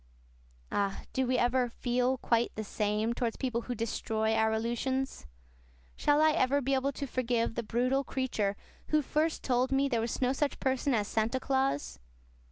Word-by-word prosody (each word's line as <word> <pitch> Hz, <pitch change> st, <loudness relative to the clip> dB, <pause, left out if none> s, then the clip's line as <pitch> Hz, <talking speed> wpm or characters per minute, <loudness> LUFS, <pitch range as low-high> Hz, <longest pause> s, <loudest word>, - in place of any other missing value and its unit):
Ah, 200 Hz, -1 st, -1 dB
do 260 Hz, -1 st, +1 dB
we 255 Hz, 0 st, +2 dB
ever 245 Hz, 0 st, +2 dB
"feel 250 Hz, +2 st, 0 dB
quite 235 Hz, -1 st, +1 dB
the 215 Hz, -, -3 dB
same" 210 Hz, +2 st, 0 dB
towards 235 Hz, -1 st, -2 dB
people 245 Hz, -3 st, -1 dB
who 245 Hz, +1 st, -4 dB
destroy 220 Hz, -1 st, -1 dB
our 220 Hz, 0 st, +3 dB
illusions? 240 Hz, -, -2 dB, 0.7 s
Shall 295 Hz, +1 st, +3 dB
I 315 Hz, -, +6 dB
ever 285 Hz, -3 st, +2 dB
be 275 Hz, 0 st, 0 dB
able 270 Hz, +1 st, +1 dB
to 280 Hz, -, -4 dB
forgive 240 Hz, -3 st, 0 dB
the 235 Hz, -, -2 dB
brutal 250 Hz, +4 st, +1 dB
creature 235 Hz, -8 st, -1 dB, 0.3 s
who 305 Hz, -1 st, +2 dB
first 310 Hz, +4 st, 0 dB
told 255 Hz, 0 st, +1 dB
me 270 Hz, +1 st, +3 dB
there 235 Hz, -4 st, 0 dB
was 230 Hz, -, -2 dB
no 255 Hz, 0 st, +2 dB
such 285 Hz, +1 st, -1 dB
person 265 Hz, 0 st, +1 dB
as 210 Hz, -2 st, 0 dB
Santa 225 Hz, +4 st, 0 dB
Claus? 265 Hz, -, -1 dB
250 Hz, 175 wpm, -31 LUFS, 225-265 Hz, 0.7 s, I